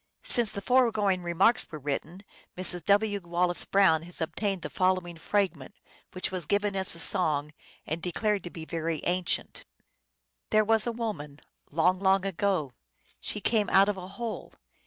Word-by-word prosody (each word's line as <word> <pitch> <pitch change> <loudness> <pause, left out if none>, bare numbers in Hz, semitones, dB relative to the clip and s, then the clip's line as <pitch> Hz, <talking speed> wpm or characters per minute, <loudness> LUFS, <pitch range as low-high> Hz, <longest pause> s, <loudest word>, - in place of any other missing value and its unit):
Since 235 -4 +5
the 200 - -6
foregoing 215 -7 +2
remarks 180 +8 +2
were 155 - -6
written, 150 +6 -5 0.3
Mrs. 180 -1 +3
W. 205 0 +2
Wallace 175 0 -1
Brown 190 -5 +4
has 175 +2 -10
obtained 190 +3 -2
tho - - -4
following 185 -2 0
fragment, 175 -5 -2 0.4
which 185 - -2
was 185 -4 -1
given 205 0 0
as 190 -3 +2
a - - -6
song, 150 -5 +1 0.3
and 160 +2 -4
declared 205 +4 -1
to - - -5
be 165 -2 -9
very 165 -1 -3
ancient: 180 0 -2 0.4
" - - -57
There 215 0 +3
was 225 +1 +3
a - - 0
woman, 170 -12 -5 0.3
long, 180 +4 +2
long 190 0 +2
ago: 185 -7 -1 0.5
She 210 - -3
came 220 0 +1
out 195 +1 +5
of 205 - -2
a 180 -1 -7
hole. 235 -2 -5
185 Hz, 165 wpm, -28 LUFS, 170-205 Hz, 0.5 s, Since